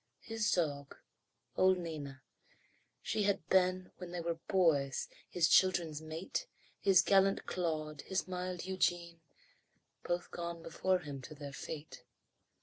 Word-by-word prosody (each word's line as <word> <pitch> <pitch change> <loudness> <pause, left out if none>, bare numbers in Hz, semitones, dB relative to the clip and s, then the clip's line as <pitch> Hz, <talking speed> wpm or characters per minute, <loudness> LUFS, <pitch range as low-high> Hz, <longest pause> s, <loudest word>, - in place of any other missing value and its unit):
His 225 -1 -1
dog, 145 -5 -1 0.6
old 185 0 +5
Nina. 150 -6 -6 0.8
She 220 - 0
had 200 -1 +1
been, 185 -1 +3
When 180 -1 -7
they 175 0 -4
were 170 0 -2
boys, 155 -8 +2 0.2
his 175 -1 +3
children's 170 -5 +3
mate, 165 - -4 0.3
His 190 -3 +5
gallant 195 +1 +4
Claude, 155 -4 -2
his 190 0 -2
mild 180 -1 -4
Eugene, 175 -3 0 0.8
Both 175 0 -2
gone 170 -1 -5
before 185 +2 0
him 145 -4 -6
to 155 - -9
their 145 -1 -8
fate. 150 +2 -7
175 Hz, 130 wpm, -34 LUFS, 155-185 Hz, 0.8 s, old